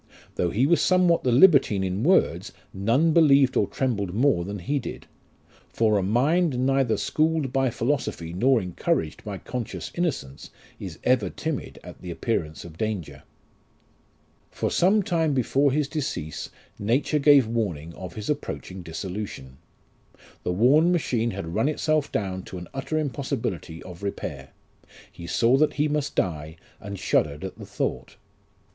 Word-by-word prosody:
Though 90 Hz, -, 0 dB
he 115 Hz, +9 st, +2 dB
was 170 Hz, +3 st, +3 dB
somewhat 180 Hz, -2 st, +3 dB
the 125 Hz, -, +2 dB
libertine 130 Hz, -, +5 dB
in 95 Hz, +2 st, -2 dB
words, 125 Hz, -, +2 dB, 0.2 s
none 120 Hz, +12 st, +2 dB
believed 140 Hz, -5 st, +5 dB
or -, -, +2 dB
trembled 105 Hz, -9 st, -2 dB
more 125 Hz, -7 st, +3 dB
than 100 Hz, +3 st, -5 dB
he 140 Hz, +11 st, -1 dB
did; -, -, -7 dB, 0.6 s
for 110 Hz, -2 st, +2 dB
a -, -, 0 dB
mind 135 Hz, -, +2 dB
neither 135 Hz, -4 st, +2 dB
schooled 155 Hz, -4 st, 0 dB
by 135 Hz, -1 st, +2 dB
philosophy 115 Hz, -, -2 dB
nor 125 Hz, +7 st, +3 dB
encouraged 85 Hz, -4 st, -2 dB
by 105 Hz, -2 st, -5 dB
conscious 120 Hz, +2 st, -5 dB
innocence, 160 Hz, -, -3 dB, 0.3 s
is -, -, -7 dB
ever 120 Hz, -7 st, +2 dB
timid 160 Hz, -, -4 dB
at -, -, -11 dB
the 90 Hz, -, -7 dB
appearance 85 Hz, -4 st, -3 dB
of 80 Hz, -1 st, -12 dB
danger. 110 Hz, -7 st, -3 dB, 1.3 s
For -, -, -2 dB
some 200 Hz, +4 st, +3 dB
time 160 Hz, -5 st, +1 dB
before 135 Hz, +2 st, +2 dB
his 145 Hz, +1 st, +1 dB
decease 140 Hz, -, -4 dB, 0.3 s
nature 130 Hz, +8 st, +1 dB
gave 140 Hz, -3 st, +6 dB
warning 95 Hz, -9 st, -3 dB
of 90 Hz, 0 st, -9 dB
his 105 Hz, -, -6 dB
approaching 115 Hz, -10 st, -4 dB
dissolution. 85 Hz, -6 st, -6 dB, 0.8 s
The -, -, -2 dB
worn 135 Hz, -, +4 dB
machine 120 Hz, -9 st, 0 dB
had 95 Hz, -6 st, -5 dB
run 115 Hz, +9 st, +2 dB
itself 155 Hz, -1 st, 0 dB
down 95 Hz, -2 st, -2 dB
to 95 Hz, -, -8 dB
an 90 Hz, -1 st, -8 dB
utter 135 Hz, +4 st, -3 dB
impossibility 125 Hz, -, -3 dB
of 90 Hz, 0 st, -11 dB
repair; 70 Hz, -9 st, -5 dB, 0.6 s
he 85 Hz, -, -10 dB
saw 120 Hz, +7 st, +3 dB
that 155 Hz, +2 st, +3 dB
he 150 Hz, +1 st, +1 dB
must 150 Hz, -1 st, -2 dB
die, 80 Hz, -3 st, -2 dB, 0.2 s
and 100 Hz, 0 st, -7 dB
shuddered 75 Hz, -4 st, 0 dB
at -, -, -7 dB
the -, -, -9 dB
thought. -, -, -3 dB
120 Hz, 150 wpm, -25 LUFS, 95-145 Hz, 1.3 s, gave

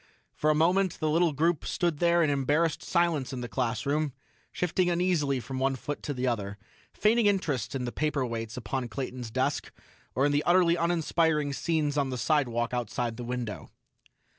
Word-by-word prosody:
For 155 Hz, -, 0 dB
a 155 Hz, -, +4 dB
moment, 180 Hz, +3 st, +2 dB
the 155 Hz, -1 st, 0 dB
little 165 Hz, +1 st, +3 dB
group 160 Hz, +2 st, +1 dB
stood 170 Hz, -4 st, -1 dB
there 170 Hz, 0 st, +4 dB
in 150 Hz, -, +2 dB
embarrassed 145 Hz, +3 st, +1 dB
silence 170 Hz, -6 st, +1 dB
in 130 Hz, -2 st, -4 dB
the 120 Hz, -, -4 dB
classroom, 130 Hz, +5 st, -1 dB, 0.4 s
shifting 180 Hz, +1 st, 0 dB
uneasily 170 Hz, -6 st, +1 dB
from 130 Hz, +3 st, -5 dB
one 135 Hz, 0 st, +1 dB
foot 145 Hz, +3 st, -5 dB
to 145 Hz, -, -3 dB
the 125 Hz, +1 st, -2 dB
other, 105 Hz, -5 st, -2 dB, 0.3 s
feigning 220 Hz, +1 st, +3 dB
interest 155 Hz, -, 0 dB
in 125 Hz, -2 st, -2 dB
the 120 Hz, -, -3 dB
paperweights 120 Hz, -7 st, -2 dB
upon 125 Hz, +2 st, -3 dB
Clayton's 125 Hz, -2 st, -5 dB
desk, -, -, -1 dB, 0.4 s
or 135 Hz, -, +3 dB
in 145 Hz, -, +3 dB
the 145 Hz, 0 st, +2 dB
utterly 175 Hz, 0 st, +4 dB
uninspiring 165 Hz, -3 st, +1 dB
scenes 150 Hz, -1 st, 0 dB
on 140 Hz, -2 st, 0 dB
the 130 Hz, -, -3 dB
sidewalk 120 Hz, -4 st, +1 dB
outside 120 Hz, -1 st, -2 dB
the 120 Hz, -, -6 dB
window. 120 Hz, -3 st, -4 dB
145 Hz, 175 wpm, -28 LUFS, 125-170 Hz, 0.4 s, a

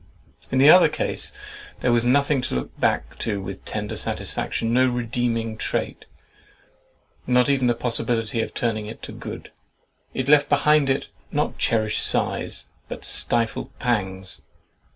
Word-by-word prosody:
In 130 Hz, -, +1 dB
the 140 Hz, +4 st, +8 dB
other 180 Hz, -, +7 dB
case, -, -, -3 dB, 0.5 s
there 125 Hz, -, +2 dB
was 120 Hz, -1 st, +3 dB
nothing 140 Hz, +2 st, +3 dB
to 125 Hz, -, -3 dB
look 65 Hz, -, -4 dB
back -, -, 0 dB
to 105 Hz, -3 st, -1 dB
with 95 Hz, 0 st, -7 dB
tender 105 Hz, -1 st, -4 dB
satisfaction, 115 Hz, +1 st, -2 dB
no 130 Hz, +1 st, +4 dB
redeeming 120 Hz, -2 st, -1 dB
trait, -, -, -3 dB, 1.2 s
not 125 Hz, +1 st, +4 dB
even 130 Hz, -3 st, +3 dB
a 120 Hz, -, +2 dB
possibility 115 Hz, -1 st, 0 dB
of -, -, -3 dB
turning 110 Hz, -3 st, -1 dB
it 110 Hz, -, -9 dB
to -, -, -6 dB
good. -, -, -8 dB, 0.6 s
It 130 Hz, 0 st, -2 dB
left 145 Hz, 0 st, +5 dB
behind 145 Hz, 0 st, +4 dB
it 135 Hz, -, 0 dB, 0.2 s
not -, -, -1 dB
cherished 110 Hz, -2 st, +1 dB
sighs, -, -, -1 dB, 0.2 s
but -, -, -7 dB
stifled 115 Hz, -1 st, 0 dB
pangs. 95 Hz, -6 st, -2 dB
120 Hz, 145 wpm, -23 LUFS, 110-130 Hz, 1.2 s, the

